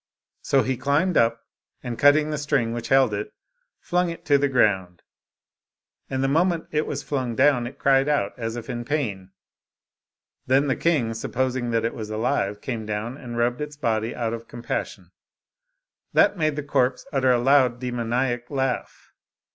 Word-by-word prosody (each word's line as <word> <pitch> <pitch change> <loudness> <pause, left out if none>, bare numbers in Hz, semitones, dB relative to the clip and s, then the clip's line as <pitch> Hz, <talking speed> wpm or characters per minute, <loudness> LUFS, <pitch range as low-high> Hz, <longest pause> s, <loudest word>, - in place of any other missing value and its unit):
So 135 -1 +2
he 130 -1 -1
climbed 155 +8 +1
up^ 115 0 +3 0.5
and 120 -2 -5
cutting 150 +2 +5
the 150 - -2
string 135 -5 0
which 120 -1 -4
held 135 -3 +4
it^ 105 +1 -3 0.5
flung 180 0 0
it 165 - -8
to 145 -1 +4
the 140 0 +1
ground. 95 -8 +1 1.1
And 130 0 -1
the - - +2
moment 165 +3 +1
it 155 0 0
was - - -4
flung 130 -5 -2
down, 125 -2 +3
it 125 - -10
cried 135 +1 +3
out, 145 -10 +1
as 115 -1 -4
if 120 -1 -7
in 120 -2 -4
pain. 115 -9 -3 1.2
Then 135 +3 +3
the 135 - +1
king, 140 -10 +1
supposing 125 +1 -2
it 115 0 0
was 110 -3 -6
alive, 110 -2 -1
came 115 -4 -4
down 110 +4 -3
and 120 -4 -8
rubbed 120 +3 0
its 150 -1 -6
body 115 -4 -1
out 115 -1 -2
of 115 0 -7
compassion; 120 0 -5 1.0
that - - +4
made 155 -4 0
the 150 - -3
corpse 130 -2 0
utter 130 -2 +2
a 125 - +4
loud 125 -1 +3
demoniac 120 0 -2
laugh. 135 -3 -3
125 Hz, 170 wpm, -24 LUFS, 115-145 Hz, 1.2 s, cutting